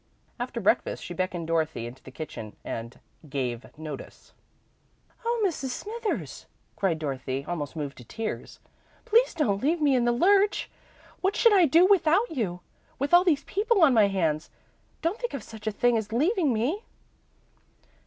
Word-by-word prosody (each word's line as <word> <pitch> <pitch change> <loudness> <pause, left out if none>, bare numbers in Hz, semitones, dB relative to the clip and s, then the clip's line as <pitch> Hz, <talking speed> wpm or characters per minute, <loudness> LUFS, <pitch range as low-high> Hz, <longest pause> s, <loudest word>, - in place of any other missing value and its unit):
After - - -3
breakfast, - - +1
she - - -6
beckoned 185 -2 -2
Dorothy 160 -6 -1
into 120 +2 -9
the - - -12
kitchen, 130 -6 -8
and 115 +2 -6 0.3
"gave 125 -4 -3
notice." 155 -3 -9 0.9
"Oh, 470 -1 0
Mrs. 320 -7 -1
Smithers," 435 - -4 0.3
cried 185 -5 0
Dorothy, 135 -2 -3
almost 155 -5 -4
moved 145 -3 -5
to - - -10
tears, 215 - -5 0.5
"please 470 0 +3
don't 210 -11 +1
leave 320 +5 +1
me 290 -3 +3
in 245 -1 +2
the 240 - +3
lurch! 400 +10 +3 0.5
What 380 +2 +1
should 465 -3 +5
I 365 -5 +6
do 330 +6 +6
without 380 +3 +3
you, 195 - -2 0.4
with 280 +5 -2
all 350 +1 +8
these 305 -6 +2
people 410 +1 +2
on 280 -5 +6
my 215 -3 +5
hands? 165 -6 0 0.5
Don't 350 +8 0
think 485 - -3
of 255 - -6
such 220 0 -10
a - - +2
thing 240 +3 +2
as 215 0 -7
leaving 310 - +2
me!" 260 - -1
240 Hz, 165 wpm, -27 LUFS, -, 0.9 s, all